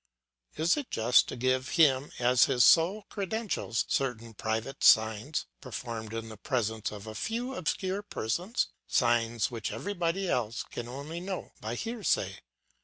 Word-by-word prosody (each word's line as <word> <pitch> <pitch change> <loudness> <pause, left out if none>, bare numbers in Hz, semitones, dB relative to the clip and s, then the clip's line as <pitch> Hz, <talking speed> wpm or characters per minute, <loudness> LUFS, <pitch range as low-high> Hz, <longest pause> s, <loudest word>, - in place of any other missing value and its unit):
Is 165 - +2
it 285 -3 -4
just 115 +2 +4
to - - -5
give 130 +1 0
him 140 -4 +4
as 125 0 +5
his 125 -3 +4
sole 185 +6 +5
credentials 200 - -2
certain 115 -4 -1
private 110 +5 -3
signs, 110 +7 +4 0.2
performed 115 -4 -6
in 115 0 -4
the 110 -1 -9
presence 110 -1 -1
of 105 -1 -8
a 110 - -7
few 235 - -3
obscure 190 0 -2
persons, 185 - -2 0.2
signs 120 -3 +2
which 115 -3 -4
everybody 190 -1 -2
else 120 -6 -1
can 120 - -7
only 140 +7 -6
know 190 +1 -5
by 110 +2 -3
hearsay? 205 - -1
130 Hz, 145 wpm, -30 LUFS, 110-180 Hz, 0.2 s, as